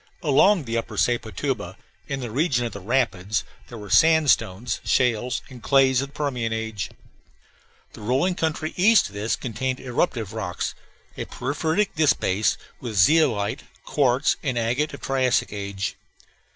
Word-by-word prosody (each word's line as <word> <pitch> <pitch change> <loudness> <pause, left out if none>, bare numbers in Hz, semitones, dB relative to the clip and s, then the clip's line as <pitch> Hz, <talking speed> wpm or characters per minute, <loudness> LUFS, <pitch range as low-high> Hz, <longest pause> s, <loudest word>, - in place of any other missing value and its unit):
Along 165 +5 +4
the 115 -2 -2
upper 115 - -7
Sepotuba, 120 -4 -1 0.3
in 140 -1 -3
the 120 -3 -5
region 130 -2 +1
of 115 - -3
the 100 - -7
rapids, 105 -2 0 0.3
there 120 - -8
were 105 -3 -9
sandstones, 125 - +3
shales, 125 -1 +1
and 125 -2 -12
clays 135 -1 +4
of 140 0 -7
Permian 125 -6 -2
age. 110 -3 -3 1.0
The - - -11
rolling 130 - +1
country 160 -2 -2
east 210 - +5
of - - -17
this 105 +1 -1
contained 130 +2 -3
eruptive 120 - -1
rocks 100 -6 -3 0.4
a - - -3
porphyritic 160 +8 -1
disbase, 130 - +2 0.2
with 115 -4 -6
zeolite, 115 - +3 0.2
quartz, 135 0 +2
and 130 -5 -2
agate 120 +6 0
of - - -14
Triassic 130 -5 +1
age. 100 -1 -4
125 Hz, 140 wpm, -24 LUFS, 110-140 Hz, 1.0 s, east